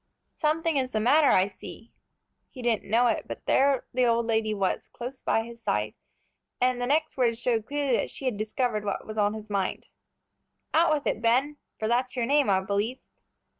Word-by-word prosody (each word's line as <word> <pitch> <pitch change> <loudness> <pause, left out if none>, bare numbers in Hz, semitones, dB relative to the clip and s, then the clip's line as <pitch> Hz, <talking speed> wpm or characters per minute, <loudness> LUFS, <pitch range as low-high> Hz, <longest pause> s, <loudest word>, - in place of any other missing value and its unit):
"Something 315 0 0
is 255 -1 -1
the 215 - +1
matter, 280 +7 +4
I 185 - +5
see." 225 +3 -11 0.6
He 255 - -10
didn't 230 -4 0
know 235 +3 +4
it, 230 -3 0
but - - -8
there 275 -1 +3
the 250 0 +2
old 235 0 +2
lady 220 -1 0
was, 195 -3 -1
close 250 +2 -7
by 225 - +1
his 235 0 -11
side, 105 - -1 0.7
and 250 0 +1
the 245 - -1
next 310 +2 0
words 235 -3 +2
showed 230 -3 0
clearly 285 -3 0
that - - -2
she 270 - -8
had 255 -4 0
discovered 215 +1 -1
what 200 -1 -3
was 215 0 -5
on 205 +1 +2
his 215 -1 -9
mind. 195 -2 -2 0.8
"Out 330 +1 +4
with 295 -2 0
it, 220 - -1
Ben, 260 +6 +2 0.2
for 215 - -2
that's 250 +2 0
your 240 -2 0
name, 285 -1 +3
I 190 -1 +3
believe." 205 +6 -1
235 Hz, 200 wpm, -27 LUFS, 215-265 Hz, 0.8 s, I